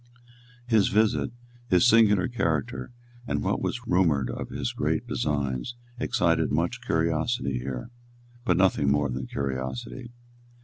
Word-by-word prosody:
His 110 Hz, -5 st, +3 dB
visit, 110 Hz, +1 st, +2 dB, 0.4 s
his 90 Hz, -1 st, +4 dB
singular 105 Hz, -5 st, +5 dB
character, 80 Hz, -, -2 dB, 0.4 s
and -, -, -1 dB
what -, -, 0 dB
was 125 Hz, 0 st, -3 dB
rumoured 85 Hz, -, +2 dB
of -, -, -5 dB
his -, -, -3 dB
great -, -, -1 dB
designs, 70 Hz, -, -2 dB, 0.2 s
excited 85 Hz, -11 st, +1 dB
much 85 Hz, -, 0 dB
curiosity 80 Hz, -, 0 dB
here, 65 Hz, -, -5 dB, 0.5 s
but 90 Hz, -8 st, +2 dB
nothing 90 Hz, -7 st, +3 dB
more 70 Hz, 0 st, +2 dB
than 65 Hz, +1 st, -4 dB
curiosity. 65 Hz, -, -4 dB
80 Hz, 125 wpm, -26 LUFS, 70-110 Hz, 0.5 s, singular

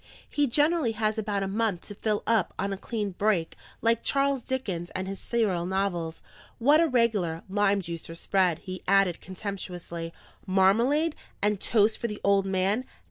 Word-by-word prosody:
He 290 Hz, -1 st, +1 dB
generally 295 Hz, -1 st, +2 dB
has 215 Hz, 0 st, 0 dB
about 205 Hz, -2 st, -1 dB
a -, -, -1 dB
month 205 Hz, -3 st, 0 dB
to 205 Hz, -, -7 dB
fill 210 Hz, 0 st, -1 dB
up 225 Hz, -6 st, +1 dB
on 200 Hz, +1 st, -1 dB
a -, -, -2 dB
clean 210 Hz, -1 st, -3 dB
break, 185 Hz, -3 st, 0 dB, 0.3 s
like 230 Hz, 0 st, +3 dB
Charles 275 Hz, -1 st, +1 dB
Dickens 195 Hz, -10 st, -3 dB
and 185 Hz, 0 st, -2 dB
his 195 Hz, 0 st, -5 dB
serial 195 Hz, -7 st, 0 dB
novels. 180 Hz, -4 st, -2 dB, 0.3 s
What 290 Hz, +7 st, +5 dB
a 335 Hz, -, +4 dB
regular, 215 Hz, -, +1 dB
lime 200 Hz, 0 st, +2 dB
juicer 165 Hz, 0 st, -6 dB
spread!" 185 Hz, -3 st, +2 dB
he 185 Hz, -1 st, -6 dB
added 195 Hz, -3 st, +3 dB
contemptuously. 180 Hz, -3 st, -6 dB, 0.4 s
"Marmalade 235 Hz, -, +3 dB, 0.2 s
and 210 Hz, -1 st, +1 dB
toast 215 Hz, -1 st, +3 dB
for 235 Hz, -, -1 dB
the 210 Hz, -2 st, -6 dB
old 200 Hz, -1 st, +3 dB
man! 190 Hz, +5 st, +1 dB
200 Hz, 165 wpm, -27 LUFS, 185-230 Hz, 0.4 s, What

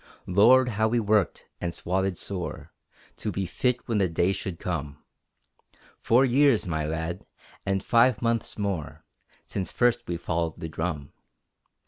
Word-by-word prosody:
Lord, 120 Hz, +7 st, +5 dB
how 110 Hz, 0 st, +1 dB
we 120 Hz, +2 st, +1 dB
worked 105 Hz, -4 st, +1 dB, 0.2 s
and 85 Hz, -1 st, -3 dB
swotted 95 Hz, 0 st, -1 dB
sore 85 Hz, -6 st, -6 dB, 0.4 s
To 105 Hz, -, -2 dB
be 95 Hz, 0 st, -2 dB
fit 125 Hz, +6 st, -1 dB
when 115 Hz, -4 st, +1 dB
the 95 Hz, -3 st, +2 dB
day 85 Hz, +3 st, +2 dB
should 95 Hz, -2 st, -4 dB
come! 75 Hz, -6 st, -4 dB, 1.0 s
Four 125 Hz, +4 st, +4 dB
years, 130 Hz, -3 st, +4 dB
my 80 Hz, -4 st, -2 dB
lad, 80 Hz, +3 st, -3 dB, 0.4 s
and 95 Hz, 0 st, 0 dB
five 120 Hz, 0 st, +4 dB
months 115 Hz, -1 st, -1 dB
more, 100 Hz, -7 st, -3 dB, 0.4 s
Since 95 Hz, -, -3 dB
first 120 Hz, -1 st, +1 dB
we 85 Hz, -, -2 dB
followed 85 Hz, -1 st, -2 dB
the 80 Hz, -, -5 dB
drum. 80 Hz, -3 st, -4 dB
95 Hz, 145 wpm, -26 LUFS, 85-115 Hz, 1.0 s, Lord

